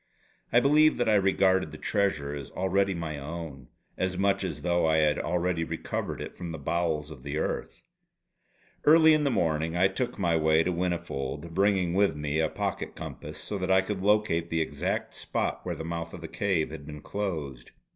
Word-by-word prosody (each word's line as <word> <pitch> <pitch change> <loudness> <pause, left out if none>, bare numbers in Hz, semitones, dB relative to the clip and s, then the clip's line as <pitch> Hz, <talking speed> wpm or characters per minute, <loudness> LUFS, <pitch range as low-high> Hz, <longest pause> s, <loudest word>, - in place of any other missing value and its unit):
I 120 - +6
believe 150 +4 +5
that 120 - +1
I 110 - +4
regarded 95 -3 +3
the 75 - -9
treasure 85 -8 0
as 70 -2 -6
already 95 +1 +1
my 80 -3 -4
own; 75 -3 -7 0.3
as 95 0 -1
much 100 0 +2
as 95 - -4
though 85 -1 +2
I 80 0 +3
had 75 -1 +3
already 90 -1 0
recovered 80 0 -4
it - - -7
from 85 -2 -6
the 80 - -5
bowels 80 -3 -1
of 70 -5 -10
the 70 +3 -4
earth. - - -3 1.0
Early 160 +1 +7
in 155 -1 +2
the - - +3
morning 80 - 0
I 95 +2 +5
took 120 +5 -3
my 85 -4 +1
way 80 0 +4
to 90 - 0
Whinnyfold, 85 -3 -3
bringing 95 -2 +2
with 100 -1 +3
me 75 +1 -2
a 80 -1 +2
pocket - - -3
compass - - -8
so 100 - -5
that 95 0 -2
I 95 0 +5
could 95 0 -4
locate 100 -5 +2
the 80 - 0
exact 80 - -2
spot - - -3
where - - -2
the 80 - -6
mouth 85 0 -4
of 85 - -10
the 80 - -6
cave 90 -4 0
had 75 -2 -8
been 75 -1 -8
closed. 75 -13 -4
85 Hz, 195 wpm, -28 LUFS, 80-95 Hz, 1.0 s, Early